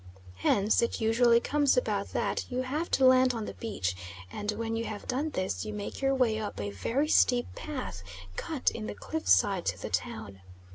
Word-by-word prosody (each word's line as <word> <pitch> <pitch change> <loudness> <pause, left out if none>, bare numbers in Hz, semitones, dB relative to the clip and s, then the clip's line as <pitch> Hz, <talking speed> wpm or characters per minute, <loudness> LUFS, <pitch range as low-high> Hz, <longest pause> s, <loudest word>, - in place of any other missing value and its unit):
Hence 200 - +3
it 235 - 0
usually 235 +1 +4
comes 290 - +2
about - - 0
that - - -1
you 255 +1 -1
have 300 +6 -2
to 265 - +3
land 255 -1 +5
on 225 -2 -3
the - - -6
beach, 90 - -3 0.4
and 205 - -2
when 225 +1 -3
you 225 - -1
have 210 -2 -6
done 275 +5 -1
this 185 -10 -2
you 215 -1 -5
make 205 +4 -6
your 270 0 +2
way 230 -4 +2
up 210 -1 -5
a 100 0 -3
very 240 - -1
steep 245 -5 +4
path, 255 - -5 0.3
cut 305 -5 -1
in 220 -1 -5
the - - -5
cliffside, 205 - +2
to - - -1
the - - -6
town. 95 +2 -3
230 Hz, 195 wpm, -29 LUFS, 205-260 Hz, 0.4 s, land